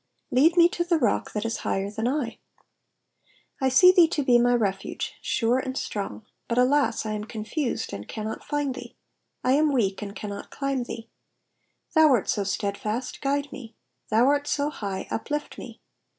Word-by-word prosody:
*'^Lead 320 +7 +4
me 340 0 +8
to 345 - -1
tlie 345 -2 +1
rock 235 -7 +1
that 210 +1 -2
is 230 - -1
higher 195 +1 -2
than 220 +2 -2
/. 260 -3 -2 1.2
I 265 - +3
see 360 +8 +7
thee 355 -3 +6
to 300 -2 -1
be 245 -2 +5
my 245 +1 +4
refuge, 195 -5 -2
sure 240 +2 +1
and 260 0 -4
strong; 205 +1 -4 0.2
but 235 - -1
alas! 265 0 +2
I 215 - -2
am 210 0 -4
confused, 235 - -3
and 100 +1 -7
cannot 215 0 -5
find 290 -2 -1
thee; 255 - -10 0.5
I 255 - +2
am 300 +2 +4
weak, 205 -8 0
and 200 -1 -6
can 210 - -6
not 200 - -7
climb 275 -3 -2
thee. 230 -1 -7 0.9
Thou 315 -2 +7
art 235 - +1
so 205 - +1
steadfast, 205 +4 -3
guide 285 0 -1
me; 230 -5 -10 0.3
thou 225 +3 +4
art 285 +1 +2
so 295 0 0
high, 200 -8 -5
uplift 295 +6 -3
me. - - -10
245 Hz, 180 wpm, -26 LUFS, 215-285 Hz, 1.2 s, me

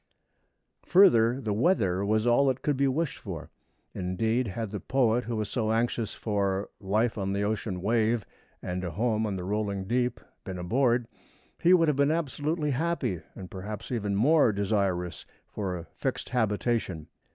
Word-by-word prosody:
Further, 130 - +5
the 110 -6 -2
weather 100 - +2
was 110 +2 +1
all 120 +3 +4
that 130 -1 0
could 145 - +1
be 140 +1 +2
wished 145 +3 -1
for. - - -7 0.4
Indeed, 110 +7 0
had 110 +1 -4
the 105 - -4
poet 125 +2 +1
who 115 0 -3
was 110 -1 -1
so 110 -1 -1
anxious 115 -1 0
for 100 -2 -1
"life 110 +3 0
on 95 0 -1
the 100 +1 0
ocean 100 -3 -2
wave 115 0 +1 0.4
and 90 +1 -3
a 90 - -2
home 110 +4 0
on 100 - -2
the 90 - -4
rolling 100 0 -2
deep" 125 +3 0 0.2
been 95 -3 -6
aboard, 120 +6 +1 0.5
he 175 - +4
would 170 -3 +6
have 150 -3 +1
been 140 0 +3
absolutely 155 0 -1
happy, 140 - -1
and 95 -2 -9
perhaps 105 +4 -6
even 105 -5 -1
more 140 +3 +4
desirous 95 -5 -1 0.2
for 95 -3 -4
a 85 - -8
fixed - - -4
habitation. 110 -7 0
110 Hz, 165 wpm, -28 LUFS, 100-125 Hz, 0.5 s, would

